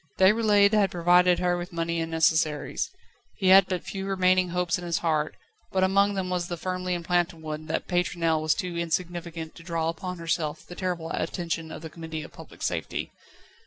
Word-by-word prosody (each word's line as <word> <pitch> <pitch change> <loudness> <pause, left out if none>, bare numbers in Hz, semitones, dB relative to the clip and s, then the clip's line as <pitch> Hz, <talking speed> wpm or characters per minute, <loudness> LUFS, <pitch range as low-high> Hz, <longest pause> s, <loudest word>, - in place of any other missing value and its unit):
Déroulède 205 +1 +5
had 205 -2 +4
provided 175 +1 +4
her 180 -1 +1
with 175 +1 -5
money 170 0 -1
and 165 - -3
necessaries. 160 - +1 0.5
He 190 - +1
had 190 0 +8
but 180 -2 -2
few 195 0 -5
remaining 185 -1 +3
hopes 180 0 0
in - - -8
his 170 -1 0
heart, 155 -2 0 0.4
but 190 -1 +2
among 200 +2 +3
them 185 -1 -2
was 175 -1 -1
the 175 - -4
firmly 185 +1 -2
implanted 175 0 0
one 155 0 -6
that 160 - -2
Pétronelle 170 -3 +1
was 155 -1 +2
too 180 -4 -4
insignificant 170 -1 -3
to - - -13
draw 165 -1 -1
upon 180 +2 -5
herself 165 -2 -2
the - - -10
terrible 175 -3 -3
attention 165 -2 -3
of 160 - -8
the 160 - -6
Committee 160 -2 -6
of - - -12
Public - - -11
Safety. - - -2
175 Hz, 190 wpm, -27 LUFS, 165-185 Hz, 0.5 s, had